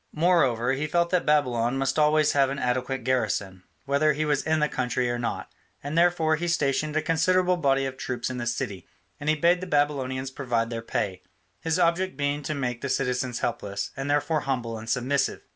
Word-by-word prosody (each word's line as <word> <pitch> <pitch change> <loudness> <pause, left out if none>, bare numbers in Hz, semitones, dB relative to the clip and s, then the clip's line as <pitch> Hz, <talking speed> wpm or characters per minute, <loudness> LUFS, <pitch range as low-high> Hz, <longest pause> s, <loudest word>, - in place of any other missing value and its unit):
Moreover, 135 -8 +3
he 145 +3 -2
felt 170 +2 +1
that 180 -3 +1
Babylon 125 -4 +2
must 135 +3 0
always 150 0 +4
have 140 -2 +3
an 140 - -3
adequate 125 0 -1
garrison, 110 -7 -1 0.2
whether 145 +2 +2
he 155 +2 -1
was 145 -2 +1
in 160 0 +1
the 150 - +2
country 125 -2 -1
or 120 - -2
not, 120 - -4 0.3
and 145 +2 -4
therefore 170 -2 +3
he 175 +2 -3
stationed 150 -2 0
a 155 - +1
considerable 180 +3 +2
body 135 -5 +1
of 135 0 -5
troops 125 -2 -3
in 130 - -4
the 120 - -3
city; 115 -6 -3 0.3
and 145 - -2
he 155 - +4
bade 170 +4 +3
the 185 - -5
Babylonians 135 -4 0
provide 120 -4 -1
their 115 -1 -3
pay, 95 -4 -3 0.4
his 160 0 -1
object 180 +2 +1
being 145 0 -1
to 150 +2 -3
make 125 -4 -3
the 140 - -3
citizens 125 -2 -1
helpless, 100 -4 -3
and 135 +1 -4
therefore 145 +2 +1
humble 125 -5 -2
and 110 +1 -7
submissive. 130 +3 0
140 Hz, 200 wpm, -26 LUFS, 125-155 Hz, 0.4 s, always